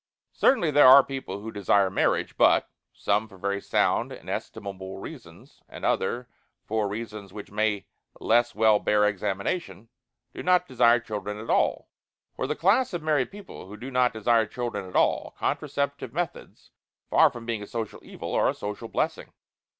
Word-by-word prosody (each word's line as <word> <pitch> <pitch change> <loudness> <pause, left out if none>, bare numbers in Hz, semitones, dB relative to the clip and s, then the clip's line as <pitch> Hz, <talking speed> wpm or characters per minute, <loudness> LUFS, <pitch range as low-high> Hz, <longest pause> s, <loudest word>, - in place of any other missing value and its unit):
Certainly 175 - +3
there 145 -2 +7
are 135 +2 +10
people 130 -8 -6
who 110 +1 -6
desire 100 -1 +2
marriage, - - 0
but - - +4 0.2
some 105 +2 0
for 100 -3 -16
very 100 +1 -2
sound - - +1
and - - -8
estimable 95 -1 -6
reasons 95 - -12
and - - -7
other 125 0 0 0.4
for 110 -1 -1
reasons 105 -1 -6
which 105 0 -9
may 105 -1 0 0.3
less 120 +1 +2
well 110 -1 +4
bear 105 0 +2
examination 105 - -3 0.4
do - - -7
not 180 0 +3
desire 120 -1 +4
children 105 -2 -5
at 110 +2 -4
all. - - +1 0.5
For 130 - -3
the 150 - -1
class 210 +8 +2
of 170 -3 -4
married 150 -5 +1
people 200 - -11
who 105 +2 -10
do 130 +4 -8
not 125 -1 +3
desire 115 0 +2
children 105 -5 -4
at - - -12
all, - - +1
contraceptive 140 -3 -2
methods, 175 +2 -5 0.4
far - - +6
from 120 -1 -10
being 115 -2 -3
a 105 - -8
social 115 -2 -5
evil, - - -7
are - - +3
a - - -2
social 105 +3 -6
blessing. - - -2
110 Hz, 170 wpm, -26 LUFS, 105-130 Hz, 0.5 s, are